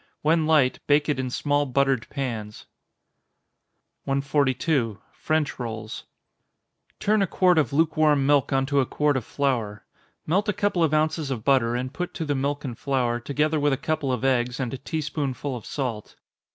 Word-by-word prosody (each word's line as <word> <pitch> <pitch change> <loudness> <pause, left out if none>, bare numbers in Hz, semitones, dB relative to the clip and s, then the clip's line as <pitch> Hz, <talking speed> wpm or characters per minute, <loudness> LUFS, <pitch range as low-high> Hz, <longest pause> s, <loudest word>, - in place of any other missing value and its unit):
When 160 +1 +3
light, 150 -5 +3
bake 145 +1 +3
it 145 - 0
in 130 -1 -2
small 145 +3 0
buttered 135 -2 +1
pans. 115 -7 -5 1.4
142. 135 -3 0 0.2
French 155 -3 -1
Rolls. 110 -2 -6 0.9
Turn 215 0 +2
a 195 - +2
quart 180 -1 +3
of 150 - 0
lukewarm 155 -2 +3
milk 145 -1 +3
on 135 -1 +2
to 140 0 +1
a 135 - +3
quart 150 -1 +1
of 130 - -1
flour. 115 -7 -2 0.4
Melt 200 +7 +1
a - - +2
couple 195 -4 +1
of 160 - +2
ounces 155 -1 0
of 120 -5 -3
butter, 125 -4 +3
and 130 +2 -3
put 180 +2 -4
to 165 - -3
the 145 - 0
milk 140 +2 -2
and 125 -3 -4
flour, 125 -2 0
together 150 +5 0
with 145 -1 +2
a - - 0
couple 155 -2 -1
of 125 +1 -1
eggs, 125 -1 +1
and 125 -2 -2
a 135 - -5
tea 155 +4 -3
spoonful 140 -2 -3
of 115 - -8
salt. 120 -7 -4
140 Hz, 180 wpm, -25 LUFS, 125-155 Hz, 1.4 s, When